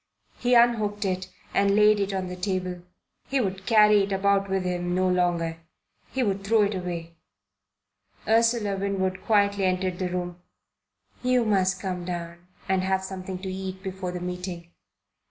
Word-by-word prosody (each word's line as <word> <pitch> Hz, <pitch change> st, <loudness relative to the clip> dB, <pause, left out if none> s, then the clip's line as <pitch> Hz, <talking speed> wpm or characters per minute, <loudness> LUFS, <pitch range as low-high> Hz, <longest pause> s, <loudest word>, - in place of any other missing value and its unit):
He 245 Hz, 0 st, +3 dB
unhooked 215 Hz, -4 st, +3 dB
it 185 Hz, -1 st, -2 dB, 0.2 s
and 200 Hz, 0 st, +3 dB
laid 210 Hz, 0 st, +5 dB
it 200 Hz, 0 st, 0 dB
on 190 Hz, -1 st, -2 dB
the 180 Hz, -, -5 dB
table. 180 Hz, -1 st, -3 dB, 0.5 s
He 275 Hz, -, +1 dB
would 190 Hz, -4 st, -3 dB
carry 210 Hz, -2 st, +6 dB
it 195 Hz, +1 st, -2 dB
about 195 Hz, 0 st, +2 dB
with 190 Hz, -1 st, 0 dB
him 175 Hz, -1 st, -1 dB
no 185 Hz, 0 st, +2 dB
longer. 175 Hz, -2 st, 0 dB, 0.5 s
He 265 Hz, -, 0 dB
would 195 Hz, -3 st, -1 dB
throw 215 Hz, +1 st, +4 dB
it 205 Hz, +1 st, 0 dB
away. 170 Hz, -3 st, -5 dB, 1.1 s
Ursula 225 Hz, -3 st, +2 dB
Winwood 190 Hz, -1 st, -1 dB
quietly 200 Hz, -2 st, +2 dB
entered 185 Hz, -1 st, 0 dB
the 185 Hz, -1 st, -1 dB
room. 175 Hz, -1 st, -4 dB, 0.8 s
"You 250 Hz, -1 st, +2 dB
must 190 Hz, -3 st, +2 dB
come 180 Hz, -2 st, -3 dB
down 175 Hz, 0 st, -6 dB, 0.2 s
and 190 Hz, -1 st, +2 dB
have 190 Hz, 0 st, 0 dB
something 190 Hz, -1 st, -5 dB
to 190 Hz, -1 st, -3 dB
eat 190 Hz, 0 st, -6 dB
before 190 Hz, -2 st, -4 dB
the 180 Hz, -, -5 dB
meeting." 180 Hz, -1 st, -6 dB
190 Hz, 160 wpm, -26 LUFS, 180-200 Hz, 1.1 s, carry